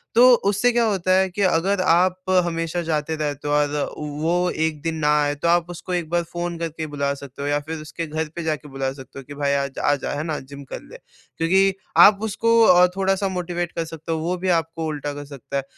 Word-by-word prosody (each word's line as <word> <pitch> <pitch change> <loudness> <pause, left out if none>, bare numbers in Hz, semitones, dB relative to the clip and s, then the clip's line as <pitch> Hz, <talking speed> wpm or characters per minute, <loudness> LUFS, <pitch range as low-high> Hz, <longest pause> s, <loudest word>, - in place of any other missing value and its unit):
तो 250 +2 +8
उससे 205 +5 +3
क्या 240 0 +2
होता 190 -4 0
है 190 0 +2
कि 185 +3 -5
अगर 190 +1 +2
आप 185 +1 +2 0.2
हमेशा 165 0 -2
जाते 155 0 -1
रहते 145 -2 -3
हो 145 - 0
और 150 0 +3 0.3
व - - -6 0.2
वो 175 +2 +1 0.2
एक 155 -2 -3
दिन 165 +1 -2
ना 155 -2 -1
आए 145 0 +1
तो 150 +4 -2
आप 170 0 +2
उसको 175 +1 -6
एक 175 -3 -2
बार 175 +1 +1
फ़ोन 175 0 -5
करके 165 -1 -4
बुला 140 -1 -1
सकते 140 -1 -10
हो 140 - -2
या 145 0 +1
फिर 160 +2 -6
उसके 160 +2 -6
घर 155 +1 -3
पे 170 - -4
जाके 155 -2 -3
बुला 135 -1 -2
सकते 135 0 -11
हो - - -10
कि, 145 - -10
भाई 140 -1 0
आज 140 -1 -2
आजा, 145 -1 +1
है 145 +1 -3
ना? 155 -2 -2
जिम 140 +1 -11
कर 135 - -8
ले। - - -13 0.4
क्योंकि 190 +4 +3 0.2
आप 200 -1 +8
उसको 230 +2 +2
अ, 180 -4 +7
थोड़ा-सा 195 0 +1
मोटिवेट 175 -1 -3
कर 165 - -3
सकते 160 0 -7
हो 160 - 0
वो 170 +3 -1
भी 185 +1 -2
आपको 165 -1 0
उल्टा 145 -1 -4
कर 145 0 -7
सकता 140 -1 -6
है, 135 - -1
165 Hz, 240 wpm, -22 LUFS, 145-180 Hz, 0.4 s, तो